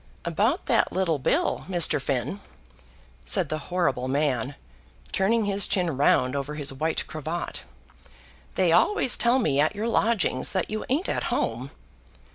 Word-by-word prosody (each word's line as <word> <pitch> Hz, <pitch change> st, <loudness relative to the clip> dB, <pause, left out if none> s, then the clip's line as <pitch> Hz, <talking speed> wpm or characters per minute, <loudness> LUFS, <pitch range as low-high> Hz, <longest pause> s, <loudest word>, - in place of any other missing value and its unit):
"About 215 Hz, -, 0 dB
that 235 Hz, -4 st, +2 dB
little 175 Hz, -5 st, 0 dB
bill, 330 Hz, -, 0 dB
Mr. 175 Hz, -5 st, +3 dB
Finn," 135 Hz, -, -2 dB, 0.8 s
said 185 Hz, -8 st, 0 dB
the 155 Hz, -, -2 dB
horrible 135 Hz, -9 st, 0 dB
man, 135 Hz, -2 st, 0 dB, 0.6 s
turning 220 Hz, +3 st, +1 dB
his 200 Hz, 0 st, +1 dB
chin 175 Hz, -6 st, 0 dB
round 130 Hz, -1 st, +2 dB
over 140 Hz, +2 st, -3 dB
his 145 Hz, -2 st, -3 dB
white 155 Hz, +4 st, -1 dB
cravat. 155 Hz, +3 st, -5 dB, 0.9 s
"They 185 Hz, -3 st, +3 dB
always 260 Hz, -, +3 dB
tell 240 Hz, +2 st, +3 dB
me 145 Hz, -, +1 dB
at 155 Hz, +7 st, +2 dB
your 215 Hz, +3 st, -2 dB
lodgings 220 Hz, -, +1 dB
that 185 Hz, 0 st, -1 dB
you 215 Hz, -, -3 dB
ain't 295 Hz, +9 st, 0 dB
at -, -, -1 dB
home." -, -, -2 dB
170 Hz, 145 wpm, -25 LUFS, 145-210 Hz, 0.9 s, Mr